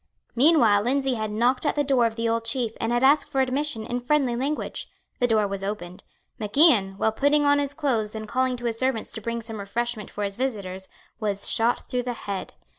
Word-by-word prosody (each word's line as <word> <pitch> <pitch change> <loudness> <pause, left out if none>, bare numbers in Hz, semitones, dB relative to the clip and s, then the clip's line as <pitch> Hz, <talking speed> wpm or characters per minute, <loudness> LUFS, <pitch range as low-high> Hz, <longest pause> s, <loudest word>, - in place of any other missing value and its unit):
Meanwhile 240 -7 +5
Lindsay 265 +3 +1
had 215 -2 -2
knocked 240 +5 +1
at 295 - +1
the 290 - +1
door 265 -4 +3
of 225 - -6
the 230 0 -1
old 230 0 0
Chief 230 0 -1
and 225 - 0
had 240 +1 +1
asked 280 +2 +4
for 275 -2 -1
admission 265 -3 -1
in 245 +2 -2
friendly 255 -1 +1
language. 275 +5 -3 0.3
The 245 - +3
door 220 -3 +2
was 195 0 -5
opened. 185 -3 -5 0.4
Mac 210 +3 -5
Ian, 230 - +5
while 220 - +1
putting 285 +5 +2
on 285 0 +4
his 285 0 -2
clothes 230 -8 -1
and 215 0 -6
calling 255 +2 0
to 240 - -8
his 230 -1 -2
servants 255 -4 -1
to 220 - -7
bring 230 +2 -3
some 220 -1 -6
refreshment 220 +1 -3
for 210 - -5
his 200 -1 -3
visitors, 195 -7 -4 0.3
was 205 -2 -2
shot 230 +2 +3
through 250 - -1
the 245 0 -3
head. 200 -4 -6
235 Hz, 220 wpm, -25 LUFS, 215-265 Hz, 0.4 s, Meanwhile